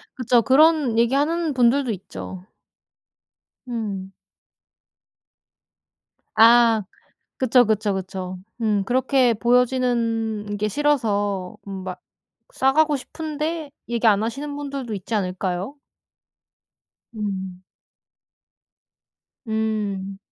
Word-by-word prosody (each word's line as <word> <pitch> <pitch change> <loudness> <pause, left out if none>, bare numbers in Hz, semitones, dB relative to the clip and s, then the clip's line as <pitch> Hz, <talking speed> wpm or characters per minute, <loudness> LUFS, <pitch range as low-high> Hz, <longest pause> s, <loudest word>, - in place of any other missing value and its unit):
그쵸. 250 -2 +3
그런 285 -1 +4
얘기하는 290 +7 +1
분들도 250 +1 +3
있죠. 185 -1 -8 1.2
음. 200 -5 -4 2.2
아. 230 -1 +6 0.6
그쵸, 250 -1 +4
그쵸, 215 -2 0
그쵸. 185 -1 -5 0.2
음. 210 -3 +1
그렇게 255 +2 +2
보여지는 230 -3 +1
게 210 +1 0
싫어서 205 -9 0
음 190 -1 -6
막 185 -1 -6 0.5
싸가고 300 - +3
싶은데 310 +2 -4 0.2
얘기 235 0 0
안 205 -1 +3
하시는 280 +6 -4
분들도 275 -5 -5
있지 200 +3 -5
않을까요? 185 +4 -2 1.4
음. 190 -3 -5 1.8
음. 210 -3 -2
230 Hz, 170 characters per minute, -22 LUFS, 200-265 Hz, 2.2 s, 아